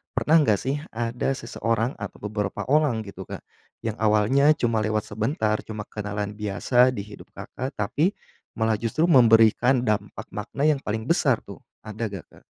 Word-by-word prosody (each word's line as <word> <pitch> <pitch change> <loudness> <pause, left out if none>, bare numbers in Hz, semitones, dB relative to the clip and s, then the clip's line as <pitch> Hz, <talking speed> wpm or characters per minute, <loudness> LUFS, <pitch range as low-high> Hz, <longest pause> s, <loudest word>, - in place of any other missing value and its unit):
pernah 160 +2 +4
enggak 110 -9 +3
sih 135 +8 -2
ada 120 +3 -2
seseorang 115 0 -1
atau 100 - -6 0.2
beberapa 105 -2 -2
orang 145 -8 +2
gitu 100 -2 -10
Kak, - - -8 0.4
yang 110 -2 -3
awalnya 110 +8 +4
cuma 115 -4 0
lewat 110 0 0
sebentar 110 0 0
cuma 105 -1 -5
kenalan 105 -1 -4
biasa 105 +5 +2
di 100 - -4
hidup 105 0 -12
Kakak, 130 +3 -6
tapi 150 - 0 0.4
malah 110 -2 0
justru 120 +8 -1
memberikan 120 -3 +5
dampak 105 -2 -2
makna 140 - -4
yang 150 -2 +3
paling 110 -3 -3
besar 140 - +1
tuh 100 - -11 0.2
ada 110 +1 -4
enggak, 100 -4 -7
Kak? - - -19
110 Hz, 160 wpm, -24 LUFS, 105-130 Hz, 0.4 s, memberikan